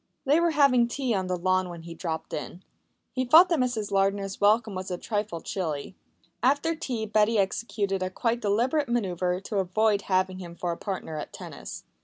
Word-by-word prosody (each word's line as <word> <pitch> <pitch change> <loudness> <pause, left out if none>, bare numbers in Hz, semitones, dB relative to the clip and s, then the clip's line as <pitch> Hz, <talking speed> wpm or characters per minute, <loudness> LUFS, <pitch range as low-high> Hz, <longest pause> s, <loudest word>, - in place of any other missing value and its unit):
They 290 +4 +4
were 340 0 +3
having 275 -6 +4
tea 255 0 -1
on 190 -2 -1
the 180 0 -1
lawn 185 +1 +1
when 170 -1 -8
he 170 0 -8
dropped 160 -1 -5
in. 155 +6 -6 0.5
He 255 - -1
thought 320 +8 +7
that 335 -4 +2
Mrs. 225 -5 -1
Lardner's 195 0 0
welcome 215 +1 +3
was 185 0 -5
a 180 - -2
trifle 205 -4 -3
chilly. 160 -2 -4 0.5
After 285 +6 +2
tea 250 -8 -3
Betty 215 +1 +2
executed 195 -1 -1
a 185 - -1
quite 230 +5 -1
deliberate 250 +8 +1
manœuvre 185 -5 -1
to 205 - -3
avoid 205 +3 +2
having 185 0 +1
him 170 -2 -8
for 175 0 -2
a - - -2
partner 180 -6 -4
at - - -7
tennis. - - -8
200 Hz, 190 wpm, -27 LUFS, 185-240 Hz, 0.5 s, thought